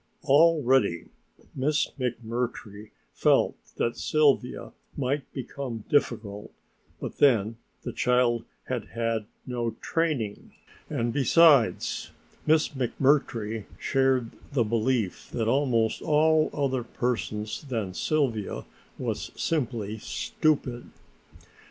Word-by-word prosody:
Already 135 - +4 0.4
Miss 145 +3 0
McMurtry 115 -3 -4 0.2
felt - - +3 0.2
that 115 - 0
Sylvia 145 -5 +1 0.3
might 140 +1 -2
become 130 -3 -5
difficult, 110 -6 0 0.5
but - - -6
then 115 -5 +4 0.3
the 120 - -5
child 120 -1 +2 0.2
had 125 -5 -3
had 115 -1 -2 0.2
no 120 -2 -2
training, 145 -11 -2 0.4
and 115 0 -1
besides 140 - +4 0.4
Miss 155 0 +4
McMurtry 125 -5 0
shared 130 -3 +1 0.2
the 130 -4 +3
belief 115 -2 -1
of 115 -2 0
almost 115 -3 +2
all 155 +1 +3
other 135 -3 0
persons 110 -3 -3
that 105 -7 -3
Sylvia 130 -9 -1 0.3
was - - -3
simply 115 -8 -2
stupid. 135 -1 -1
125 Hz, 95 wpm, -27 LUFS, 110-140 Hz, 0.5 s, Already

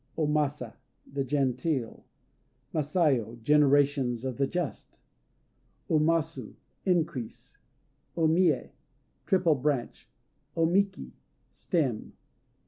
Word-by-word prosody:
O 160 - +1
Masa 145 -5 -1 0.4
"The 140 -1 0
Genteel." 135 -1 -1 0.7
Masayo 145 - +1
"Generations 140 -3 +3
of 130 -3 -3
the 140 0 +1
Just." 175 -3 -5 0.9
O 155 - +4
Masu 155 -6 0 0.3
"Increase." 160 -10 -2 0.6
O 165 - +2
Mië 175 +3 +2 0.6
"Triple 185 -5 +3
Branch." 140 -3 -2 0.5
O 165 - +4
Miki 195 +3 0 0.4
"Stem." 135 - -2
145 Hz, 90 wpm, -28 LUFS, 130-165 Hz, 0.9 s, O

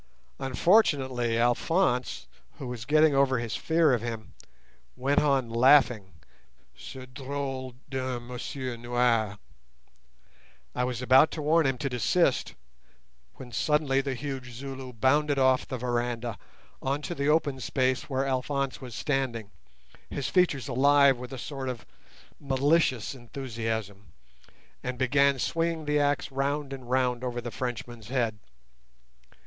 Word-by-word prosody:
Unfortunately 130 - +2
Alphonse, 125 +3 +1 0.3
who 135 - -7
was 125 -2 -6
getting 155 +2 +4
over 135 -1 +3
his 115 -3 -3
fear 160 -3 +3
of 120 - +1
him, 115 -2 -6 0.6
went 140 +3 +2
on 135 -4 +2
laughing 120 -4 +4 0.6
at - - -17
"ce - - -9
drôle 130 -1 -5
d'un 130 -3 -3
monsieur 125 +1 -5
noir". 120 -3 +1 1.4
I 125 - 0
was 125 -1 -3
about 130 +4 +6
to 155 - -4
warn 160 0 +3
him 135 -1 0
to 140 - -2
desist, 130 +4 +1 0.8
when 125 -2 -11
suddenly 145 +1 +1
the 135 -1 -3
huge 130 -2 -6
Zulu 130 +1 -7
bounded 140 +5 +2
off 130 -1 +3
the 130 - -4
veranda 120 -3 -2 0.4
on 140 +2 -2
to 175 - -3
the 140 -2 -1
open 150 -3 +2
space 130 +1 0
where 135 0 0
Alphonse 135 +1 -2
was 125 -3 -8
standing, 130 -7 -2 0.6
his 140 - -3
features 170 -9 +2
alive 140 +1 +5
with 125 +1 -8
a 135 - -6
sort 135 +1 -5
of 125 -3 -6 0.5
malicious 140 -3 +1
enthusiasm, 115 -5 -5 0.7
and 125 0 -4
began 140 +2 +3
swinging 165 +3 -1
the 150 0 +2
axe 145 -3 0
round 140 +1 -1
and 130 -3 -9
round 125 -1 +1
over 120 -1 -3
the 120 0 -6
Frenchman's 120 -2 -5
head. 115 -4 -1
130 Hz, 135 wpm, -28 LUFS, 120-140 Hz, 1.4 s, about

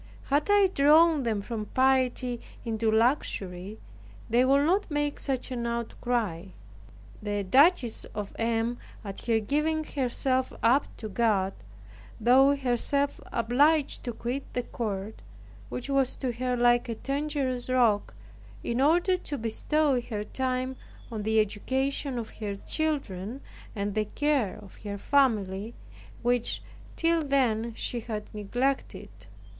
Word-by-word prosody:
Had 290 +6 +2
I 410 -1 +6
drawn 310 +2 +5
them 220 -5 -1
from 215 -1 -4
piety 255 -1 +1 0.2
into 225 -1 0
luxury, 215 -5 0 0.5
they 240 +2 +5
would 275 +2 +4
not 380 +5 +2
make 295 -1 -1
such 265 -1 -2
an 235 -2 -2
outcry. 235 -6 -2 0.8
The 205 -1 -2
Duchess 265 - +4
of 205 -2 -6
M. 230 +1 0 0.3
at 200 +3 -7
her 225 -1 +3
giving 300 +7 0
herself 260 -2 -1
up 255 +5 +4
to 220 - -6
God, 200 -3 +1 0.7
thought 270 +5 +5
herself 275 +3 0
obliged 275 +6 +2
to 240 - -1
quit 245 +4 -4
the 245 - -1
court, 210 -3 -4 0.5
which 250 - -5
was 275 -2 +1
to 260 -3 -2
her 250 +1 -1
like 240 0 +3
a 230 - -2
dangerous 275 -1 -2
rock, 235 -5 +2 0.5
in 235 +2 -1
order 350 +6 +4
to 290 -5 -5
bestow 270 +4 +1
her 220 -3 -4
time 255 +3 -2 0.3
on 220 -2 -3
the 220 +1 +2
education 265 +6 -1
of 230 -2 -5
her 205 -2 -3
children 250 - -2 0.4
and 200 0 -2
the 215 0 0
care 275 -2 0
of 195 - -15
her 205 -1 -6
family, 215 -4 +1 0.5
which, 245 -1 +1 0.3
till 330 0 +2
then, 235 -6 +1
she 240 - -3
had 215 -2 -6
neglected. 245 +6 -2
245 Hz, 130 wpm, -28 LUFS, 220-275 Hz, 0.8 s, I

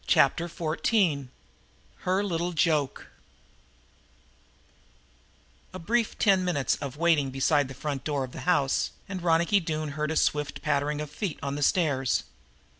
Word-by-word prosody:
Chapter 165 +5 +3
Fourteen 160 - 0 0.7
Her 185 +2 0
Little 175 -2 -2
Joke 150 -2 0 2.6
A - - -3
brief 225 +6 0
ten 195 -3 +3
minutes 170 -7 +1
of 140 -1 -6
waiting 160 -4 +3
beside 135 +2 +2
the 135 - -9
front 140 -1 -4
door 145 -3 -1
of 130 - -7
the - - -8
house, 140 -6 +2 0.2
and 195 -1 -5
then 175 - -9
Ronicky 170 +5 +4
Doone 155 -3 -3
heard 150 +1 -2
a 160 - -2
swift 150 -2 0
pattering 145 0 0
of 150 -1 -6
feet 170 +1 -4
on 140 0 -2
the 145 - -4
stairs. 140 -4 +2
150 Hz, 145 wpm, -27 LUFS, 140-175 Hz, 2.6 s, Ronicky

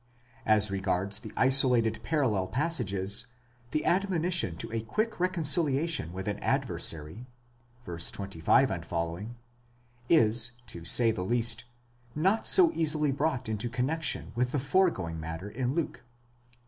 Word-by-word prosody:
9 110 - +5
As 105 -1 +3
regards 95 +1 -1
the 110 -2 -10
isolated 125 -4 +6
parallel 120 -12 0
passages, 110 - 0 0.4
the 155 - -2
admonition 175 - 0
to - - -7
a 115 - -2
quick 215 - -3
recon 180 -2 -1
ciliation 150 - 0
with 95 +2 -7
an 105 - -3
adversary 80 +10 -2 0.6
(v. 85 -1 -7
25 100 +7 +1
f.), 85 0 -6 1.2
is, 115 -5 +4
to 85 -7 -8
say 115 +7 +4
the 110 - -5
least, 115 +2 -1 0.5
not 190 +9 +1
so 360 -4 +6
easily 150 - 0
brought 135 -3 -2
into 110 +2 -3
connexion 135 +7 -3
with 125 +2 -1
the 145 - 0
foregoing 130 - 0
matter 80 +5 -7
in 125 +4 -3
Luke 170 -2 -2
(xii. 120 0 -35
120 Hz, 135 wpm, -28 LUFS, 100-150 Hz, 1.2 s, isolated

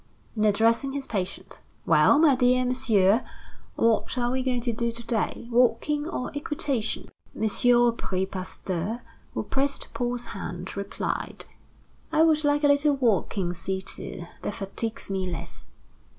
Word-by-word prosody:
And 215 -1 +2
addressing 230 +6 +2
his 280 -1 -3
patient: 195 -3 -4 0.3
"Well, - - +5
my 305 -2 +6
dear 250 0 +3
Monsieur, 230 -4 +3 0.5
what 230 +2 +1
are 240 0 +1
we 260 0 0
going 255 -2 0
to 235 -1 -1
do 235 +1 -1
to 235 +1 -8
day? 230 0 -1
Walking 255 +5 +2
or 250 -8 -3
equitation?" 285 -5 -2 0.3
M. - - -1
Aubry 235 -4 +2
Pasteur, 190 +3 -4 0.3
who - - -1
pressed 275 +1 -2
Paul's 245 -1 -1
hand, 180 -2 -6
replied: 200 0 -4 0.7
"I 315 - +4
would 315 -1 +4
like 290 0 +2
a - - +6
little 285 0 +4
walking 200 - +1
seated; 190 -1 -5
that 205 - -3
fatigues 200 +2 -4
me 190 -1 -1
less." 170 - -6
235 Hz, 140 wpm, -26 LUFS, 200-260 Hz, 0.7 s, my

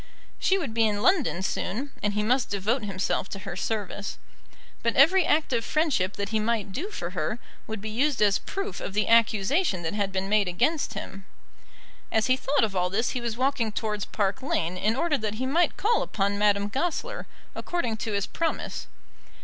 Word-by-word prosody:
She 385 - +3
would 290 -12 -3
be 225 -1 +3
in 205 0 -1
London 270 - +2
soon, 235 +9 -2
and 205 0 0
he 210 - +1
must 245 +3 +2
devote 210 +5 0
himself 195 -1 -1
to 195 - -5
her 185 -3 -5
service. 200 0 -3 0.6
But 230 - 0
every 335 +6 +6
act 300 -3 +2
of 230 -1 +1
friendship 275 - +1
that 200 0 -3
he 220 0 +1
might 215 -2 -1
do 330 - -4
for 175 - -5
her 180 +4 -2 0.3
would 220 -2 -5
be 220 - -4
used 270 +4 +1
as 205 -2 +4
proof 395 +1 -4
of 195 - -5
the 210 - +2
accusation 230 - +3
that 160 - -2
had 200 -2 -1
been 190 0 -1
made 205 -1 +3
against 220 - 0
him. 195 -2 -7 0.9
As 220 0 +2
he 255 - +4
thought 275 0 +1
of 210 -3 0
all 180 0 +1
this 220 +5 0
he 250 - -3
was 235 -1 -3
walking 255 -4 +1
towards 210 -1 -2
Park 200 +3 -1
Lane 180 -10 -1
in 215 +5 +1
order 305 0 +1
that 215 -1 -2
he 255 +4 -2
might 325 +5 +2
call 455 +4 +2
upon 200 0 0
Madame 205 -1 +3
Goesler 345 - -2 0.3
according 245 -11 -2
to 220 0 -3
his 200 -1 0
promise. 330 -1 -3
220 Hz, 200 wpm, -27 LUFS, 200-270 Hz, 0.9 s, every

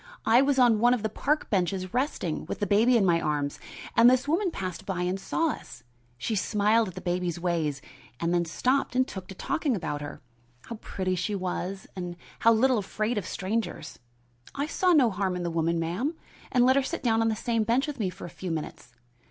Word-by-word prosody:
I 230 +3 +6
was 275 0 +2
on 240 -4 +5
one 240 +2 +5
of 225 - -6
the 220 - 0
park 295 +8 -1
benches 185 -1 0
resting, 250 - -1
with - - -4
the 205 - -1
baby 225 +5 +4
in 205 - +3
my 170 -2 +3
arms, 145 -1 -1 0.4
and 235 +1 +8
this 255 +2 +2
woman 355 +6 +1
passed 185 - -5
by 180 -2 -2
and 180 +2 -1
saw 325 +10 0
us. 125 - -10 0.3
She 225 - -2
smiled 210 +2 +2
at 185 - -8
the - - -6
baby's 175 -1 -1
ways, 165 -5 -1 0.4
and 170 +1 0
then 175 -1 +2
stopped 250 - 0
and 255 +1 +3
took 190 -2 -7
to 190 - -9
talking 285 - -1
about 155 -6 -3
her, 145 - -7 0.5
how 230 - -7
pretty 185 -3 -3
she 185 +4 -1
was 185 +1 -3
and 180 -2 -5 0.2
how 230 - +5
little 245 +1 +3
afraid 215 +3 -1
of 185 - -7
strangers. 215 +4 -3 0.6
I 280 +1 -1
saw 360 +4 +1
no 270 -9 +5
harm 190 -1 -1
in 180 - -3
the 170 - -2
woman, 165 0 0
ma'am, 190 - -2 0.4
and 245 -1 +4
let 260 +2 +5
her - - +5
sit 270 - -4
down 225 -2 +3
on 225 - +2
the 220 - 0
same 230 +1 0
bench 235 +5 +2
with 295 -4 -6
me 200 -4 0
for 180 - -9
a - - -7
few 180 +1 -6
minutes. 150 -6 -5
205 Hz, 220 wpm, -27 LUFS, 175-245 Hz, 0.6 s, and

